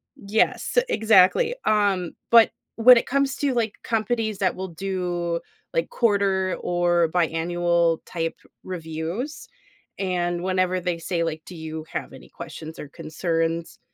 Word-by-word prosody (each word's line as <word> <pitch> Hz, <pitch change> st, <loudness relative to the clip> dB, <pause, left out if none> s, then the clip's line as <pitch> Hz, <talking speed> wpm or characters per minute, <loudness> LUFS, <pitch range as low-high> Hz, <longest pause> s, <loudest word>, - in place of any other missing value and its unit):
Yes, 220 Hz, -, 0 dB
exactly. 220 Hz, -, +4 dB
Um, 200 Hz, -5 st, +2 dB, 0.2 s
but 230 Hz, -1 st, +7 dB, 0.3 s
when 245 Hz, +2 st, +8 dB
it -, -, 0 dB
comes 275 Hz, +1 st, +1 dB
to, 280 Hz, -2 st, 0 dB
like, 225 Hz, -3 st, 0 dB
companies 220 Hz, -2 st, -1 dB
that 185 Hz, -2 st, +2 dB
will 190 Hz, +1 st, -4 dB
do, 175 Hz, -1 st, -2 dB, 0.3 s
like, -, -, 0 dB
quarter 200 Hz, -, +1 dB
or 175 Hz, -1 st, +2 dB
biannual-type 170 Hz, 0 st, 0 dB, 0.3 s
reviews, 170 Hz, -, -5 dB, 0.5 s
and 175 Hz, -2 st, -1 dB
whenever 185 Hz, -1 st, +1 dB
they 175 Hz, -1 st, -1 dB
say, 170 Hz, 0 st, -1 dB
like, 160 Hz, -1 st, -3 dB
"Do 180 Hz, -, -10 dB
you 160 Hz, 0 st, -6 dB
have -, -, -4 dB
any 130 Hz, -, -13 dB
questions 160 Hz, -1 st, -9 dB
or 145 Hz, -, -8 dB
concerns?" 165 Hz, +1 st, -2 dB
180 Hz, 130 wpm, -24 LUFS, 170-215 Hz, 0.5 s, when